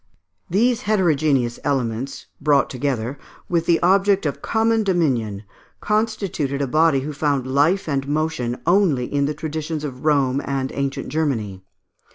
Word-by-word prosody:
These 230 +6 +2
heterogeneous 150 - +2
elements, 135 0 -2 0.2
brought 145 -1 +3
together, 130 0 -2 0.3
with 170 -1 0
the 170 -1 +4
object 195 +1 +3
of 145 - -2
common 225 0 +1
dominion, 130 - 0 0.4
constituted 205 -10 -1
a 140 - +1
body 155 0 +3
who 150 +3 -5
found 140 -2 0
life 145 +9 +2
and 140 -2 -1
motion 145 -5 -1
only 170 -8 +3
in 140 +2 0
the 150 - -3
traditions 155 0 -4
of 130 -4 -6
Rome 140 -3 +2
and 135 -1 -2
ancient 140 0 -3
Germany. 115 -12 -2
145 Hz, 140 wpm, -21 LUFS, 135-170 Hz, 0.4 s, the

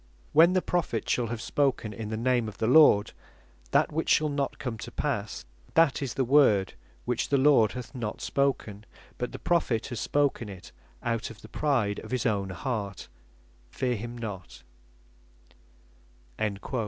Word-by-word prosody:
When 170 +4 +6
the 185 - +1
Prophet 165 -11 -1
shall 120 -2 +1
have 115 0 -5
spoken 125 -4 0
in 105 +1 -6
the 110 - -3
name 120 0 +1
of 105 - -8
the - - -1
Lord, 120 -5 +6 0.6
that - - +2
which 160 +2 -2
shall 155 0 +4
not 140 -1 -2
come 115 -4 -5
to - - -7
passe, - - -3 0.3
that's 140 -5 +2
the 135 - +1
word 115 -8 +4 0.3
which 120 -1 -1
the 140 - +3
Lord 130 -7 +4
hath 125 +1 -7
not 115 -5 -4
spoken, 115 -7 -1 0.3
but 125 - -3
the - - -6
Prophet 150 -10 0
has 120 -4 -4
spoken 140 -5 0
it 95 -3 -11 0.3
out 115 -2 -1
of 115 0 -13
the - - -10
pride 120 -9 0
of - - -10
his 130 -3 -2
own 100 -4 0
heart, 100 - -4 0.6
fear 125 -1 -1
him 120 +3 -6
not." 105 -6 -7
120 Hz, 160 wpm, -28 LUFS, 110-140 Hz, 0.6 s, When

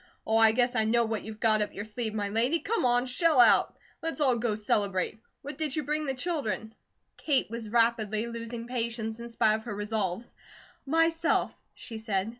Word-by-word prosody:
Oh, 220 - +2
I 225 -1 +6
guess 245 +2 +1
I 220 - +2
know 235 +1 +3
what 220 -1 -2
you've 220 0 -8
got 215 -1 +3
up 210 - -3
your 205 - -5
sleeve, 220 0 -4
my 205 -1 -2
lady. 235 +10 +2
Come 420 - -1
on, 245 0 +3
shell 305 +3 +2
out! 245 - +5 0.2
Let's 325 -1 -3
all 265 -4 +3
go 230 -2 -1
celebrate. 205 -1 -1 0.2
What 280 +1 -7
did 305 -4 -1
you 305 - -1
bring 300 +2 -1
the 270 - -1
children?" 240 - -3 0.4
Kate 275 -7 +1
was 230 -2 -4
rapidly 230 -1 +1
losing 230 0 -6
patience 230 -2 -3
in 235 0 -7
spite 220 -2 +3
of 220 0 -3
her 220 -4 -5
resolves. 210 0 -3 0.5
"Myself," 330 +2 +2 0.2
she 225 -2 -7
said. 210 -2 -1
230 Hz, 195 wpm, -28 LUFS, 220-255 Hz, 0.5 s, I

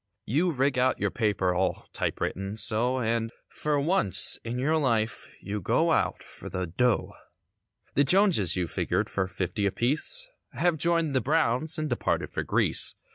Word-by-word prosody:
You 165 +9 +1
rig 135 -2 0
out 130 +1 +2
your - - -1
paper 100 -5 0
all 90 0 -2
type - - -2
written 95 +3 -4
so 120 +4 +1
And 115 -1 -1 0.2
for 150 -1 -1
once 140 - +3
in 115 +1 -4
your 150 +5 +1
life 115 -7 -1
you 100 +1 -5
go - - +1
out - - 0
for - - -11
the 90 0 -3
"dough." 120 +8 0 0.8
The 140 - +3
Jonses 165 - +3
you 90 -1 -1
figured - - -2
for 95 -2 -1
fifty 95 +2 -2
apiece 155 - +3 0.3
Have 175 -2 0
joined 165 0 +1
with - - -6
the 130 - +2
Browns 125 +8 +1
and 155 0 -2
departed 120 -4 -2
for - - -3
Greece. - - +2
125 Hz, 170 wpm, -27 LUFS, 100-150 Hz, 0.8 s, once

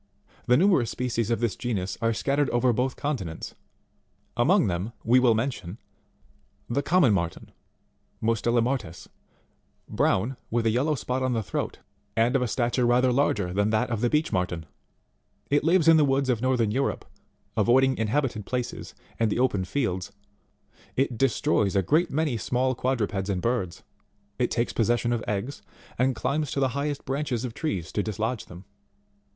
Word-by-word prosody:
The 125 0 +5
numerous 175 - +3
species 120 -3 -2
of 115 0 0
this 115 -4 0
genus 100 -7 -3
are 115 0 +2
scattered 140 +5 0
over 120 0 +2
both 125 +3 -1
continents; 105 - -4 0.8
among - - +4
them 95 +5 -2
we 120 +3 +5
will 120 -3 +4
mention: 110 -5 -3 0.9
24. - - -3
The 140 - +2
Commntt 145 - +4
IMarteii, 85 -3 -2 0.7
Mustela 115 +1 +1
Martex, 120 -10 -3 0.8
brown, 120 +7 0
with 115 0 0
a 110 - +3
yellow 140 +7 +1
spot 125 0 -2
on 130 -1 0
the 115 -2 -1
throat, - - -3 0.4
and 115 +4 +3
of 135 - +3
a 125 - +1
stature 120 +2 0
rather 125 +1 +3
larger 105 -9 +1
than 100 +2 +1
that 110 +3 0
of 110 -2 -1
the 120 - +2
Beech 150 +3 0
Marten. 90 -3 -1 0.9
It 145 - +3
lives 165 0 +3
in 165 -1 +8
the 155 - +5
woods 135 -1 +1
of 120 -3 +1
northern 125 -4 +1
Europe, 135 +5 -1 0.5
avoiding 130 +5 +4
inhabited 110 0 0
places 125 +3 -4 0.2
and 115 -1 +2
the 105 - -1
open 120 -7 +1
fields; 95 -5 -2 0.8
it 135 -2 0
destroys 110 -5 +1
a 95 - +3
great 165 - +2
many 150 -4 0
small 125 +4 0
quadrupeds 110 -6 -1
and 95 -2 0
birds; 95 -5 -2 0.6
it 125 - +2
takes 115 0 -1
possession 120 +1 +1
of 115 - -2
eggs, 105 +7 -3 0.4
and 130 0 +2
climbs 145 +5 -1
to 140 - -2
the 135 -1 +2
highest 140 +2 -3
branches 135 -3 -2
of 120 - -5
trees 95 - -3
to 105 - 0
dislodge 110 +3 -3
them. 90 +2 -12
120 Hz, 170 wpm, -26 LUFS, 110-135 Hz, 0.9 s, in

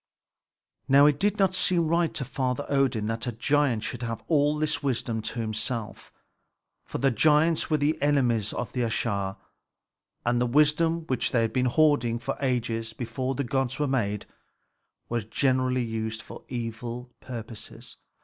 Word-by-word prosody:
Now 140 +2 +7
it 145 -1 +3
did 205 +1 +1
not 190 -2 +3
seem 180 -3 +2
right 170 +1 +2
to 135 - -2
Father 130 +1 -2
Odin 135 -6 +1
that 115 +2 -3
a - - 0
giant 125 0 +1
should 120 - -4
have 115 -1 -4
all 150 -1 +3
this 150 0 0
wisdom 120 -5 -1
to 115 +2 -4
himself; 110 0 -3 0.7
for - - -5
the 135 0 +2
giants 155 +5 +3
were 155 - +3
the 150 +1 0
enemies 125 -7 +2
of - - -4
the 125 - -2
Æsir, 100 -4 -1 0.9
and 120 0 +2
the 125 - +2
wisdom 150 +5 +3
which 130 -4 0
they 115 -2 +2
had 115 - -1
been 130 -1 +2
hoarding 125 -4 +3
for 135 +3 -3
ages 115 -4 -1
before 130 +2 -3
the 140 - -1
gods 135 0 -1
were 150 - +1
made 105 -6 -1 0.8
was 120 -2 -2
generally 130 +1 +1
used 110 0 -4
for - - -11
evil 120 +1 -5
purposes. 115 -3 -8
125 Hz, 160 wpm, -27 LUFS, 115-145 Hz, 0.9 s, Now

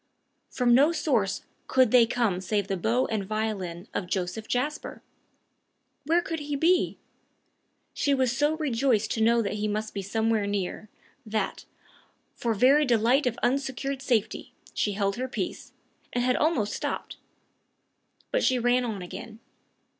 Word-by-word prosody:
From 245 -2 +2
no 285 +6 +6
source 250 - 0 0.2
could 255 -4 +3
they 240 -2 +6
come 225 -7 0
save 200 0 -1
the 195 - -1
bow 230 +8 +1
and 215 -3 -1
violin 195 -4 -3
of 185 - -3
Joseph 185 +4 -3
Jasper! 290 +5 -3 1.0
Where 340 +2 +3
could 325 -1 -4
he 290 -1 -3
be? 345 +5 +2 1.0
She 285 -1 +1
was 260 -2 +1
so 295 +3 +1
rejoiced 255 -7 +1
to 225 - -1
know 230 +1 +4
that 200 - -2
he 215 - 0
must 215 +1 -3
be 200 - -3
somewhere 220 +1 0
near, 205 +1 -3 0.3
that, 215 -2 -3 0.7
for 230 -2 -1
very 270 +8 +5
delight 245 +2 +3
of 240 - -1
unsecured 270 +1 -1
safety, 240 -6 -1 0.2
she 205 - 0
held 200 0 -1
her 255 +1 -2
peace, 260 - -5 0.4
and 245 - +1
had 250 0 +2
almost 295 -10 +1
stopped. - - -4 1.1
But - - +1
she 255 - +3
ran 245 +1 +2
on 215 -6 -4
again. 220 +5 -9
235 Hz, 150 wpm, -27 LUFS, 210-265 Hz, 1.1 s, no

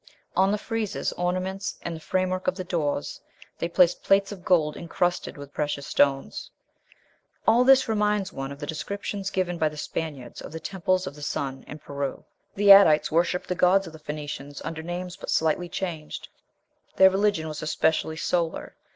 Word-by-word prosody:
On 190 +1 +4
the 210 - +1
friezes, 220 -1 -2
ornaments, 185 +2 -2
and 170 - -4
the - - -8
framework 185 +2 -1
of 185 - +2
the 185 - -4
doors 155 -5 -2 0.4
they 170 - -1
place 175 0 +5
plates 195 0 +2
of 190 -3 -9
gold 160 -5 +2
incrusted 175 0 -2
with 145 0 -10
precious 145 -1 -2
stones." 135 - +1 1.0
All 240 +2 +6
this 265 0 +6
reminds 210 -3 0
one 135 0 -5
of 140 - -7
the 145 - -6
descriptions 200 +5 -4
given 180 -3 -1
by 155 - +3
the 150 - -11
Spaniards 145 -5 -5
of - - -9
the 160 - -5
temples 185 +1 -1
of 140 - -5
the 150 - -13
sun 135 -2 -3
in 150 - -8
Peru. 140 -2 -5 0.3
The 200 0 +6
Adites 165 -6 +7
worshipped 170 +2 +1
the - - 0
gods 180 +2 +4
of 165 - -10
the 160 - -11
Phoenicians 145 -2 -6
under 165 0 -4
names 175 +2 -5
but - - -9
slightly 160 +2 +1
changed; 170 -5 -5 0.7
"their 190 0 +7
religion 195 -4 +1
was 155 -1 -5
especially 160 0 0
solar... 170 0 -1
175 Hz, 175 wpm, -26 LUFS, 150-190 Hz, 1.0 s, Adites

